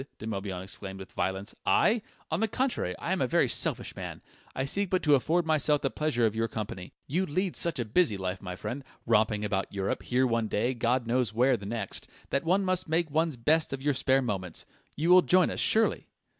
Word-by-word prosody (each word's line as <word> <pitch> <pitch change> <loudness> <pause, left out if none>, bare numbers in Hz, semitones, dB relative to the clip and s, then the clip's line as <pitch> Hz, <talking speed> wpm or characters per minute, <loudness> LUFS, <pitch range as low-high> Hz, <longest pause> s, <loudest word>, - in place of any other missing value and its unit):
De - - -8
Morbihan 95 -4 -4
exclaimed 95 0 -6
with 95 0 -10
violence. 95 +3 -2
"I? 225 +1 +3 0.3
On 160 - +1
the 225 - +2
contrary, 220 - -1
I - - -4
am - - 0
a - - +2
very - - +3
selfish - - 0
man; - - -7 0.3
I 130 - -1
seek 200 +7 0
but 185 0 0
to 150 - +4
afford 160 +6 +2
myself 150 -2 +2
the 135 - -1
pleasure 150 -7 +1
of 110 -1 0
your 115 0 0
company. 100 -5 -6
You 180 +7 -1
lead 185 +5 -1
such 170 -2 0
a 120 - -1
busy 110 - +2
life, 95 0 -4
my 90 -2 -6
friend, 125 +8 -5 0.2
romping 110 -2 +2
about 100 -2 -1
Europe, 100 -1 -2
here 130 +1 +1
one 115 -2 0
day, 115 +5 0
God 120 +1 0
knows 120 -2 0
where 125 +2 +4
the 100 -4 -7
next, 110 -3 -4 0.2
that 140 - +1
one 185 +4 +2
must 185 -2 -1
make 165 -1 +1
one's 160 0 +1
best 155 +6 +2
of 135 0 -5
your 145 0 +2
spare 135 0 +2
moments. 95 -7 -4 0.3
You 165 +4 +1
will 180 0 +9
join 180 0 +3
us, - - -4
surely?" 225 0 +2
130 Hz, 220 wpm, -29 LUFS, 105-160 Hz, 0.3 s, will